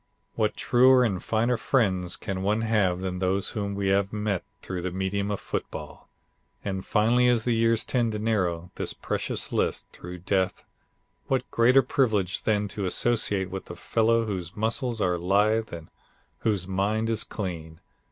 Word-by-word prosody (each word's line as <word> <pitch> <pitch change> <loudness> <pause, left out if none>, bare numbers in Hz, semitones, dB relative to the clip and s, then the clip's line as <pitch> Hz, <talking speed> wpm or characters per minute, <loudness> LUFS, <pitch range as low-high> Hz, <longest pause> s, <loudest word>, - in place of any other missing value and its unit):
"What 110 -2 0
truer 130 +1 +5
and 100 -7 -1
finer 115 +2 +1
friends 95 -8 0
can 95 -1 -4
one 105 +3 +1
have 100 -5 +1
than 90 -1 -3
those 95 +1 0
whom 100 -2 -3
we 100 -1 0
have 100 0 +2
met 105 -3 -1 0.2
through 90 -2 -4
the 95 - -2
medium 95 +2 -2
of 105 - -2
football! 75 -1 -6 0.6
And 95 -2 -2
finally 115 +3 +3
as 120 -2 +3
the 120 - +2
years 115 0 +2
tend 120 -3 0
to - - -2
narrow 90 -6 -1
this - - -2
precious - - -3
list, - - 0
through 90 +1 -8
death, 95 -2 0 0.6
what 130 -1 -1
greater 125 +3 +5
privilege 110 -8 +1
than 105 -1 +1
to 100 0 -3
associate 100 -3 +1
with 95 0 -5
the 85 - -8
fellow 115 +4 +2
whose 95 -5 -4
muscles 115 +1 -1
are 90 -2 +1
lithe 105 +5 +2
and 85 -2 -8 0.5
whose 100 -5 0
mind 100 +4 0
is 115 -1 +1
clean. 85 -5 -6
105 Hz, 165 wpm, -26 LUFS, 95-115 Hz, 0.6 s, truer